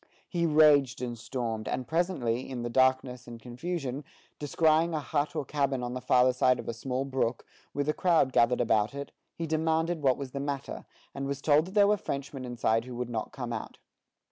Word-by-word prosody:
He 170 -2 0
raged 150 -4 +5
and 120 -1 -3
stormed; 115 -2 -4
and 130 - -3
presently, 150 -9 -1
in 125 -3 -4
the 120 - -3
darkness 130 -1 +2
and 120 -1 -9
confusion, 135 +3 -4 0.4
descrying 160 +2 +2
a - - 0
hut 145 0 -2
or 140 - -2
cabin 140 -3 -1
on 120 0 -3
the 125 - -4
farther 125 0 +4
side 125 0 +3
of - - -8
a 115 - -2
small 130 +3 -3
brook, 130 -3 -1 0.3
with 145 0 -2
a 150 - +2
crowd 165 -8 +2
gathered 120 +1 +3
about 110 +1 +1
it, 140 0 -6 0.2
he 165 - -3
demanded 160 +1 0
what 130 -3 +3
was 135 -2 -6
the 140 - -4
matter, 140 -1 -4 0.3
and 140 0 -4
was 140 0 -3
told 150 +2 +3
that 190 - -10
there 205 -1 +6
were 210 0 +3
Frenchmen 140 -6 -5
inside 115 -2 0
who 125 -1 -8
would 120 0 -4
not 110 -2 -3
come 125 -3 -5
out. 110 - -6
135 Hz, 205 wpm, -29 LUFS, 125-150 Hz, 0.4 s, there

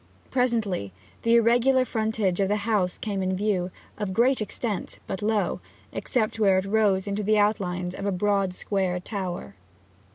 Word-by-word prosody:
Presently 225 - 0 0.3
the 230 0 +3
irregular 245 +3 +4
frontage 220 -6 0
of 195 - +3
the 205 - +1
house 205 -5 +1
came 200 -3 -3
in 185 0 0
view, 190 -3 0 0.3
of 195 -3 -3
great 250 +2 +3
extent, 215 -2 -3
but 190 0 -4
low, 210 0 0 0.3
except 225 -3 -1
where 195 -3 +4
it 190 - 0
rose 200 -2 +2
into 200 +1 -2
the 215 +1 +2
outlines 185 -4 0
of 200 - -4
a - - +1
broad 195 0 +1
square 190 -3 -1
tower. 180 - -5
205 Hz, 160 wpm, -26 LUFS, 190-220 Hz, 0.3 s, irregular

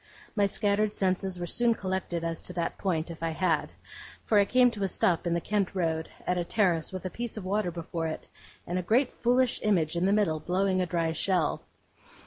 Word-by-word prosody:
My 205 -2 +3
scattered 205 +1 +1
senses 185 -1 0
were 175 - -2
soon 235 +6 +2
collected 185 -3 -3
as 165 0 -3
to 180 - -5
that 170 -1 -3
point, 170 -3 -1
if 165 - -10
I 165 - 0
had; 165 -1 0 0.5
for 210 - +4
I 200 - +5
came 250 +2 +4
to 210 - -7
a 195 - +2
stop 175 -1 +1
in 170 - +1
the - - +1
Kent 200 +1 -1
Road, 160 -3 -1 0.2
at 180 0 0
a - - 0
terrace 170 -4 +1
with 185 0 -6
a 185 - -3
piece 235 -2 -5
of 200 - -6
water 200 0 0
before 165 -1 -4
it, 155 - -6 0.4
and 180 +2 -2
a - - 0
great 240 +8 +2
foolish 245 +1 +2
image 175 -7 +1
in 175 +2 +1
the - - +3
middle, 200 -7 +2
blowing 185 +2 +1
a 180 - 0
dry 165 -1 0
shell. 170 0 0
185 Hz, 220 wpm, -28 LUFS, 170-205 Hz, 0.5 s, I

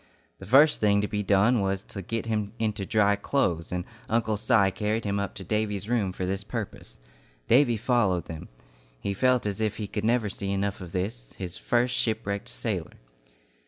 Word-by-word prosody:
The 95 - -10
first 145 +7 +6
thing 100 -1 +4
to 105 - -1
be 105 0 -2
done 105 +5 +3
was 95 0 -1
to 100 - -8
get 115 +4 -3
him 105 -2 -2
into 105 -4 -2
dry 105 -1 +3
clothes, 100 - 0
and 90 0 -2 0.2
Uncle 110 -1 +1
Si 105 -2 +3
carried 110 +2 -1
him 100 0 0
up 100 -1 -3
to 95 - -6
Davy's 105 0 -1
room 110 -5 +1
for 90 0 -4
this 95 +2 -2
purpose. 110 -1 -6 0.5
Davy 120 -1 +4
followed 105 -7 +1
them. 80 -1 -8 0.5
He 100 - -2
felt 125 +3 +2
as 105 +1 -2
if 110 -1 0
he 105 - -3
could 105 +1 -4
never 115 0 +2
see 100 0 -3
enough 100 0 -1
of 90 -2 -8
this, 90 - -3
his 90 -2 -5
first 120 +5 +1
shipwrecked 110 -3 -1
sailor. - - -3
105 Hz, 190 wpm, -27 LUFS, 95-115 Hz, 0.5 s, first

